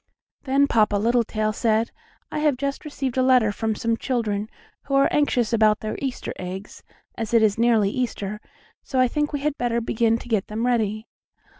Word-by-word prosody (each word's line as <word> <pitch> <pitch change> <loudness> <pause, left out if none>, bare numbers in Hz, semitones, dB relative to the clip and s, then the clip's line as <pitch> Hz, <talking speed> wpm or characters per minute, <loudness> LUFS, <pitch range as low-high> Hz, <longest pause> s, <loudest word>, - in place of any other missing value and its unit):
Then 275 +1 +3
Papa 215 -6 +2
Littletail 215 0 +1
said: 225 0 +1 0.4
"I - - -2
have 300 -4 +2
just 280 +2 -3
received 270 -4 -4
a - - +4
letter 255 -4 +4
from 220 +1 -2
some 230 +2 0
children, 220 -4 -2 0.4
who 275 - -1
are 275 - +5
anxious 245 -6 +1
about 215 -2 +3
their 215 - -3
Easter 270 -3 -4
eggs, 185 +2 -7 0.4
as 225 +1 -1
it 225 - +5
is 215 0 +2
nearly 225 -4 +3
Easter, 210 -4 -3 0.4
so 260 - -2
I 255 - +5
think 295 +4 -1
we 290 -2 -3
had 295 0 -2
better 235 -1 0
begin 230 0 +1
to 240 - -11
get 220 -5 0
them 220 +3 -3
ready." 220 -3 0
230 Hz, 185 wpm, -23 LUFS, 215-260 Hz, 0.4 s, are